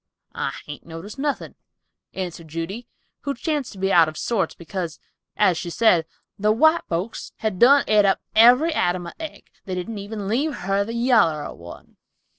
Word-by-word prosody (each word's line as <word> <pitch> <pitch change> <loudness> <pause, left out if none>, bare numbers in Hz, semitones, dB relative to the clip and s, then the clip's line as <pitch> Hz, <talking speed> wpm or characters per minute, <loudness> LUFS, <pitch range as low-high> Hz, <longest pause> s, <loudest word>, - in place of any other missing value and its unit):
"I - - -3
hain't 145 -1 -9
noticed 170 +10 -9
nothing" 290 0 -2 0.6
answered 175 -3 -5
Judy, 165 +9 -5 0.3
who 280 -1 -3
chanced 295 0 -2
to - - -13
be 195 +1 0
out 165 -2 +6
of 155 - -10
sorts, 230 -5 -1
because, 170 -2 -5 0.4
as 175 -3 +3
she 175 - -5
said, 170 -4 +3 0.3
"the 210 +1 +3
white 315 +9 +4
folks 180 +6 -4
had 215 -5 -2
done 280 +4 +7
et 210 -1 +5
up 195 -1 +3 0.2
every 250 +9 +6
atom 175 -7 0
of 170 - -8
egg; 320 -1 -8
they 185 - -4
didn't 205 +4 -4
even 205 0 -6
leave 280 +8 0
her 195 +2 +1
the 230 +3 -6
yaller 230 - +3
of - - -8
one!" 85 +1 -12
200 Hz, 180 wpm, -23 LUFS, 175-240 Hz, 0.6 s, done